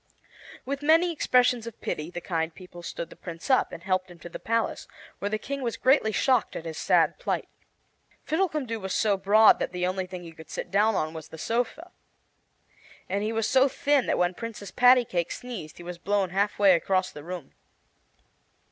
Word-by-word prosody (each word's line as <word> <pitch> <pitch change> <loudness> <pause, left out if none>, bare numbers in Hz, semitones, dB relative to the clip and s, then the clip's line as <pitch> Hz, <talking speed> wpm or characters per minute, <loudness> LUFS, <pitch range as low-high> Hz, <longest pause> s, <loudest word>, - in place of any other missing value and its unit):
With 280 +2 -3
many 325 +4 +4
expressions 250 -6 +2
of 230 - -9
pity 155 +2 -4
the 175 0 -6
kind 165 -2 -2
people 180 -2 -12
stood 170 0 -6
the - - -11
Prince 170 +9 -6
up 260 - +3
and 170 - -9
helped 185 -1 0
him 175 - -13
to 175 - -10
the - - -8
palace, 230 0 -1 0.3
where 205 - -2
the 215 - -1
King 275 +5 -5
was 235 -3 -2
greatly 260 -4 +3
shocked 255 +2 +1
at 165 - -6
his 160 -1 -5
sad - - +3
plight. - - -2 0.8
Fiddlecumdoo 305 -9 -1
was 190 -2 -3
so 210 -2 +2
broad 210 +3 +5
that - - -2
the 180 0 -1
only 185 0 -2
thing 180 -1 -8
he 165 - -9
could 160 -1 -14
sit - - -6
down 210 +2 +3
on 155 -2 -1
was 160 -2 -8
the 160 - -11
sofa, 245 - -2 1.2
and 200 +2 -1
he 215 +1 -1
was 225 -1 0
so 265 +1 +5
thin 280 0 +1
that - - +1
when 180 0 +2
Princess 220 -1 -7
Pattycake 245 -9 +4
sneezed 210 -12 -7
he 175 - -10
was 175 0 -7
blown 195 0 0
half 200 +2 0
way 200 -2 +6
across 185 +2 +1
the 145 - -10
room. 175 -4 -7
200 Hz, 200 wpm, -27 LUFS, 175-245 Hz, 1.2 s, way